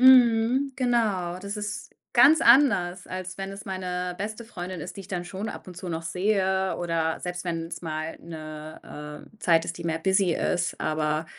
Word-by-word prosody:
Mhm, 255 +1 +6
genau. 215 -9 +1
Das 200 +2 -5
ist 210 0 -5 0.2
ganz 315 +2 +7
anders, 210 -9 +5
als 185 0 -6
wenn 195 0 -4
es 195 0 -8
meine 180 -1 -3
beste 215 +3 -4
Freundin 185 -5 -6
ist, - - -7
die - - -6
ich 190 - -11
dann 180 -2 -3
schon 195 +5 -5
ab - - -8
und 180 -2 -10
zu 180 - -6
noch 165 -1 -3
sehe 190 +2 +1
oder 165 -2 0
selbst 180 0 -4
wenn‘s 165 -1 -3
mal 155 -1 -4
‘ne, 155 -2 -8
äh, - - -23
Zeit 165 -5 +4
ist, 170 - -5
die 170 - -7
mehr 165 -1 0
busy 190 0 +3
ist. 175 -1 0
Aber 155 0 0
180 Hz, 185 wpm, -26 LUFS, 165-205 Hz, 0.2 s, ganz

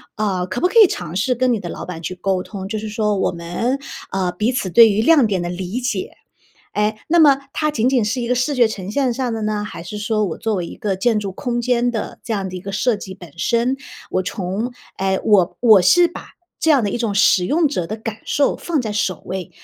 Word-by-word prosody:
啊， 195 -4 -1
可 185 - -3
不 360 - +3
可 365 - -9
以 - - +6
尝 175 - -5
试 250 +6 +1
跟 255 0 +2
你 225 - -1
的 175 -3 -6
老 - - -6
板 170 -3 -7
去 180 +2 -5
沟 185 0 -1
通， 195 -2 -7
就 215 +1 -3
是 215 - -5
说： 210 -1 0
“我 - - +1
们， 175 +10 -2 0.3
啊， 185 -2 -1
彼 210 +7 0
此 245 -7 -2
对 230 0 +8
于 205 - +1
亮 310 -2 +5
点 190 -4 -1
的 175 - -3
理 185 +6 -4
解， 240 -7 -2 0.6
诶， 210 +1 +1
那 340 +1 +3
么 285 -4 +6
它 305 -1 0
仅 245 -4 +1
仅 255 -5 +2
是 245 +4 -1
一 235 - -3
个 250 - +2
视 255 +4 0
觉 240 -3 +4
呈 195 -3 -6
现 255 +2 +1
上 250 -2 -2
的 220 -1 -3
呢？ 210 -1 -1
还 210 - -8
是 195 +5 -7
说 215 0 0
我 170 - -5
作 220 -1 -1
为 175 -2 -2
一 - - -9
个 205 -5 -1
建 220 +2 +1
筑 200 -2 -4
空 240 +4 -2
间 245 0 +1
的 225 -3 -5
这 225 - -3
样 195 -2 -2
的 185 - -9
一 - - -6
个 195 - -6
设 215 +3 +1
计 190 -2 -8
本 175 -6 -13
身， 240 +6 +1 0.3
我 185 - 0
从 195 +6 -3 0.3
诶， 190 0 +1
我 195 -4 +3
我 215 -6 +7
是 345 - +6
把 340 - -10 0.3
这 320 - +2
样 275 -5 +5
的 205 - 0
一 240 - -2
种 225 -4 -1
使 195 -2 +4
用 320 +2 +2
者 180 - -2
的 215 - -4
感 220 0 -6
受 285 - +1
放 315 -6 -1
在 215 -2 -3
首 200 -3 -1
位， 190 -3 -5
215 Hz, 275 characters per minute, -20 LUFS, 190-245 Hz, 0.6 s, 对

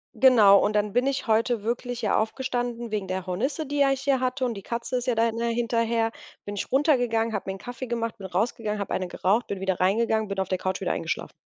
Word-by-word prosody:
Genau, 215 -7 +7
und 210 - +1
dann 210 -1 +1
bin 250 +2 +2
ich 275 -1 -1
heute 225 -1 +1
wirklich 245 +1 -3
hier 215 - +2
aufgestanden 240 0 -2
wegen 205 -3 -2
der 185 0 -3
Hornisse, 255 - -2
die 290 +1 -3
ja 275 -1 +5
ich 270 -1 -1
hier 275 -1 +2
hatte, 255 +1 -1
und 240 - -1
die 200 - -8
Katze 235 +4 -3
ist 250 +1 -4
ja 245 - +2
da 230 +1 +2
dann 230 - -6
hinterher 230 -1 0 0.3
bin 205 - -5
ich 200 - -4
runtergegangen, 245 -6 +2
habe 200 -2 -3
mir 190 - -3
'n - - -9
Kaffee 245 +5 -7
gemacht, 230 -1 -3
bin 190 - -6
rausgegangen, 210 +3 -1
habe 200 - -3
eine 185 - -1
geraucht, 200 +6 0
bin 200 - -4
wieder 190 -1 -1
reingegangen, 220 +3 +2
bin 200 0 -4
auf 190 - -1
der 185 - -1
Couch 185 0 -2
wieder - - 0
eingeschlafen. - - -3
230 Hz, 245 wpm, -26 LUFS, 205-245 Hz, 0.3 s, Genau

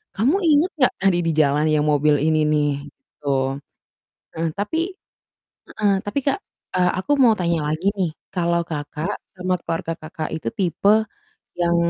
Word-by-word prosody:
"Kamu 250 - +3
ingat 310 +3 +4
gak - - 0
tadi 190 -3 +3
di - - +3
jalan 145 +1 +2
yang 150 -1 +3
mobil 150 +1 +3
ini 155 0 +2
nih?" 150 -1 +2 0.2
Gitu. 265 - -16 1.1
Heeh, 165 0 -1
tapi 210 +11 -1 0.9
heeh, 205 -2 +1
tapi, 205 +7 -1
Kak, 285 +8 +1 0.4
eee, 180 -1 +3
aku 240 - -3
mau 235 -3 +7
tanya 170 -2 +1
lagi 165 +5 -2
nih, 180 -5 0 0.2
kalau 170 -1 +1
Kakak 150 0 -4 0.2
sama 185 0 0
keluarga 165 0 -2
Kakak 155 0 -6
itu 160 - -3
tipe 205 +3 +2 0.5
yang 170 0 +2
170 Hz, 150 wpm, -22 LUFS, 155-205 Hz, 1.1 s, mau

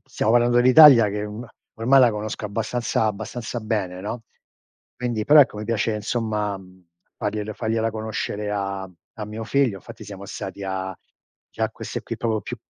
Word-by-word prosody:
stiamo 110 - -1
parlando 120 0 +3
dell'Italia 125 -2 +8
che 105 +1 -3
un 105 +3 -7 0.3
ormai, 130 +4 +5
la 125 -2 +6
conosco 105 0 -5
abbastanza 115 +2 -1
abbastanza 110 +3 -4
bene, 100 -5 -3
no? 110 +4 -5 0.7
Quindi 120 -3 -3
però, 150 +4 +8
ecco, 125 -6 +2
mi 105 - -5
piace, 115 0 0
insomma, 105 -2 -2
mhmm, 95 -1 -18 0.3
fargliel 105 -1 -3
fargliela 115 +1 -1
conoscere 110 -1 -4
a 100 -1 -3
mhmm, 90 - -19 0.2
a 105 - -3
mio 110 +2 -6
figlio, 125 -7 +1
fatti 115 -1 -11
siamo 100 -1 -9
stati 95 +1 -7
a 95 -1 -4 0.5
già - - -2
queste - - -6
qui, - - -6
proprio 110 -2 -1
più - - -7
110 Hz, 170 wpm, -23 LUFS, 100-115 Hz, 0.7 s, dell'Italia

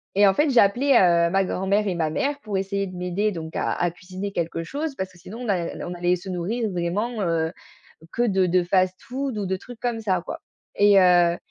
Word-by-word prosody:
et 205 +1 +6
en 195 - +4
fait, 295 +9 +2
j'ai 250 -3 +6
appelé, 225 +8 +2
heu, 170 -8 +5
ma 195 +1 +3
grand-mère 195 +3 0
et 185 - -1
ma 160 -2 0
mère 280 - -1
pour 205 -5 -3
essayer 195 +1 -2
de 185 - -9
m'aider 180 +4 -1
donc 160 -3 -7
à - - 0
à 175 -1 0
cuisiner 185 +3 -7
quelque 165 -1 -2
chose 285 - -4
parce 190 -4 -4
que 180 - -19
sinon 210 +7 -10
on 245 - -4
a 200 - +3
n 170 -1 -5
on 175 - -5
allait 175 0 +1
se 185 +2 -10
nourrir 205 +6 -2
vraiment, 205 +6 -2
heu, 165 -2 0 0.6
que - - -1
de 190 -5 +2
de 180 +1 +2
fast-food 195 +8 -1
ou 205 - -2
de 190 0 -1
trucs 240 +4 -12
comme 240 -2 -2
ça 190 -4 0
quoi - - -6 0.4
et 205 0 +5
heu, 175 -1 +4
190 Hz, 235 wpm, -24 LUFS, 175-215 Hz, 0.6 s, et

